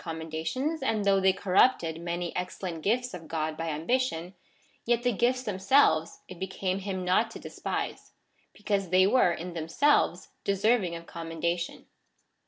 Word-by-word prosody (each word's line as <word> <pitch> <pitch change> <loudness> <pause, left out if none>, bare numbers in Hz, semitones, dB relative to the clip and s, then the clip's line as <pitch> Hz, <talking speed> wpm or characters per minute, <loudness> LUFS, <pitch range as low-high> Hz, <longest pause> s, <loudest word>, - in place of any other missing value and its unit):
commendations, 165 - -3
and 220 -6 0
though 195 -1 +4
they 190 0 +5
corrupted 185 -3 +2
many 175 0 -3
excellent 180 -2 -4
gifts 245 +6 0
of 165 -3 -8
God 155 -1 -2
by 165 +1 -3
ambition, 175 +2 -1 0.5
yet 240 0 +1
the 245 - +3
gifts 245 +4 +1
themselves 195 - +2
it 180 - -10
became 190 0 -2
him 190 -2 -4
not 185 +5 +3
to - - -9
despise, - - -5 0.4
because 200 -3 -2
they 185 +1 +5
were, 200 -3 +4
in 175 +1 -5
themselves, 170 - +1
deserv 210 +3 +2
ing 170 -2 -3
of 165 0 -8
commendation. 170 +1 -3
185 Hz, 150 wpm, -28 LUFS, 165-220 Hz, 0.5 s, they